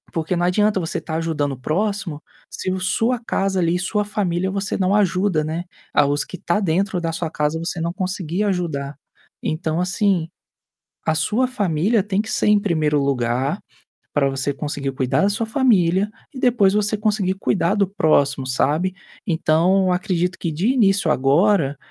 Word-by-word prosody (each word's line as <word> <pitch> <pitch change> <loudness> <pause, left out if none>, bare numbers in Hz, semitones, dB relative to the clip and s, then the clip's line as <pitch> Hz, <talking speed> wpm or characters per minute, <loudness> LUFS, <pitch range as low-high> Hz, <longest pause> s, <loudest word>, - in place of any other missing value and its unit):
Porque 165 +2 -1
não 175 0 +1
adianta 205 +2 +2
você 165 -3 -3
tá 160 - -5
ajudando 160 -3 -1
o 130 - -9
próximo, 180 +1 -2 0.3
se 185 - -4
o 190 - -2
sua 225 +6 0
casa 195 -4 -1
ali, 170 0 +2
sua 210 +3 0
família, 190 -3 -1
você 195 +1 -2
não 190 0 +1
ajuda, 185 -4 +2
né. 160 +3 -3 0.3
Ah, 145 - +4
os 145 +1 0
que 185 - -8
tá 170 +3 0
dentro 190 +1 0
da 165 -1 -1
sua 165 0 -3
casa, 150 +1 -1
você 170 +1 -4
não 170 +1 -2
conseguir 185 0 -2
ajudar. 160 -8 -2 0.5
Então 160 0 -1
assim, 185 -3 +1 0.8
a 160 - +2
sua 215 +11 +1
família 205 -2 +1
tem 200 0 -1
que 220 - -7
ser - - +1
em 210 -1 +5
1º 155 -7 +1
lugar 135 - 0 0.5
para 140 -2 +2
você 135 +1 -1
conseguir 140 -1 -4
cuidar 130 +2 0
da 195 - +4
sua 220 +2 -1
família 205 -6 +2 0.2
e - - -7
depois 235 -7 +3
você 210 +1 +1
conseguir 205 -3 0
cuidar 190 -1 0
do 200 -1 +3
próximo, 145 -8 +1
sabe. 150 +8 0 0.3
Então 180 +2 +2
acredito 180 -2 -1
que 170 - -2
de 175 +9 0
início 200 -9 +3
agora, 145 +2 +3
180 Hz, 175 wpm, -21 LUFS, 155-200 Hz, 0.8 s, em